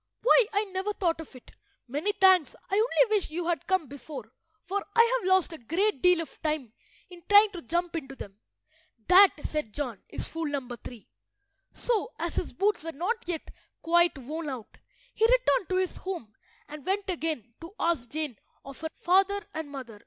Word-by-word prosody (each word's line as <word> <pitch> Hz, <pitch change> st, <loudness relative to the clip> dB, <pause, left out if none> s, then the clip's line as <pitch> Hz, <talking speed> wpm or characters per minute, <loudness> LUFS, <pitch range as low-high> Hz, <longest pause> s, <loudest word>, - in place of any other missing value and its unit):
"Why, -, -, +6 dB
I 410 Hz, 0 st, +1 dB
never 385 Hz, +1 st, -3 dB
thought 335 Hz, -5 st, 0 dB
of 300 Hz, -, -12 dB
it! 255 Hz, -, -14 dB, 0.4 s
Many 295 Hz, +11 st, -1 dB
thanks. 375 Hz, -6 st, +4 dB, 0.2 s
I -, -, -3 dB
only 440 Hz, +1 st, +3 dB
wish 405 Hz, -, 0 dB
you 335 Hz, +2 st, -3 dB
had 340 Hz, -1 st, -1 dB
come 375 Hz, -3 st, +2 dB
before, 265 Hz, -3 st, -9 dB, 0.3 s
for 395 Hz, +3 st, -2 dB
I 470 Hz, +2 st, +5 dB
have 375 Hz, -, -4 dB
lost 375 Hz, -3 st, +3 dB
a 320 Hz, -, -8 dB
great 335 Hz, -, 0 dB
deal 360 Hz, -2 st, +5 dB
of 330 Hz, -, -10 dB
time 300 Hz, -8 st, -2 dB, 0.4 s
in 350 Hz, -1 st, -11 dB
trying 410 Hz, +1 st, +7 dB
to 355 Hz, -4 st, -7 dB
jump 345 Hz, +1 st, -2 dB
into 275 Hz, -4 st, -5 dB
them." 200 Hz, -5 st, -10 dB, 0.7 s
"That," 380 Hz, +1 st, +8 dB
said 300 Hz, -8 st, -3 dB
John, 255 Hz, -8 st, -4 dB
"is -, -, -5 dB
fool 330 Hz, -1 st, -3 dB
number 270 Hz, -4 st, -4 dB
three." 235 Hz, -2 st, -11 dB, 0.6 s
So, 460 Hz, -1 st, -1 dB
as -, -, -3 dB
his -, -, -1 dB
boots 410 Hz, -3 st, 0 dB
were 330 Hz, -, -4 dB
not 395 Hz, -, -2 dB
yet 340 Hz, -3 st, -4 dB, 0.3 s
quite 345 Hz, -1 st, +3 dB
worn 300 Hz, +4 st, -5 dB
out, 250 Hz, -5 st, -7 dB, 0.4 s
he -, -, -2 dB
returned -, -, +3 dB
to 370 Hz, -, 0 dB
his 370 Hz, -1 st, 0 dB
home 345 Hz, -, -6 dB, 0.3 s
and 295 Hz, -1 st, -9 dB
went 390 Hz, +2 st, -1 dB
again 315 Hz, -, -3 dB
to 335 Hz, +5 st, -10 dB
ask 315 Hz, -9 st, 0 dB
Jane 300 Hz, -7 st, -3 dB, 0.3 s
of 275 Hz, +1 st, -10 dB
her 320 Hz, -, -2 dB
father 390 Hz, +3 st, +2 dB
and 315 Hz, -2 st, -5 dB
mother. 255 Hz, -7 st, -8 dB
335 Hz, 190 wpm, -28 LUFS, 285-390 Hz, 0.7 s, That